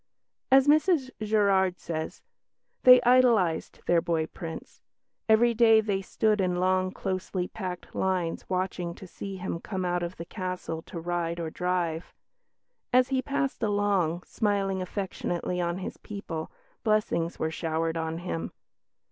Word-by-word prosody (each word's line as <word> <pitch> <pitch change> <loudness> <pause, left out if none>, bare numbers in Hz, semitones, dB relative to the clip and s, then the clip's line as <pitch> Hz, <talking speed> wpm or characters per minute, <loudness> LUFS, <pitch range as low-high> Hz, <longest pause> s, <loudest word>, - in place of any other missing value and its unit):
As 270 +1 +6
Mrs 300 -3 +3
Gerard 200 -4 +2
says, 160 -1 -5 0.6
"They 250 0 +9
idolised 235 -10 +3
their 170 -1 +3
boy 165 -2 0
Prince. 165 0 -8 0.5
Every 235 +2 +5
day 225 -1 +6
they 205 -3 0
stood 210 +2 +1
in 180 -1 +1
long, 185 +1 +1
closely 185 -1 -3
packed 185 -4 -6
lines 185 -3 -1
watching 180 -2 -2
to - - -11
see 195 +2 -7
him 180 -2 -4
come 190 0 -4
out 175 0 0
of 175 +1 -4
the 170 - -6
castle 180 -4 -4
to 170 - -6
ride 170 0 -2
or 165 -2 -3
drive; 175 -2 -2 0.8
as 255 0 +4
he 265 -1 +1
passed 275 -1 -2
along, 200 -5 +1
smiling 195 -3 0
affectionately 180 -2 -3
on 170 0 -1
his 185 - -6
people, 170 -6 -6 0.3
blessings 210 -6 +1
were 160 - -1
showered 160 0 -1
on 160 0 -2
him. 175 -1 -4
185 Hz, 140 wpm, -28 LUFS, 170-210 Hz, 0.8 s, They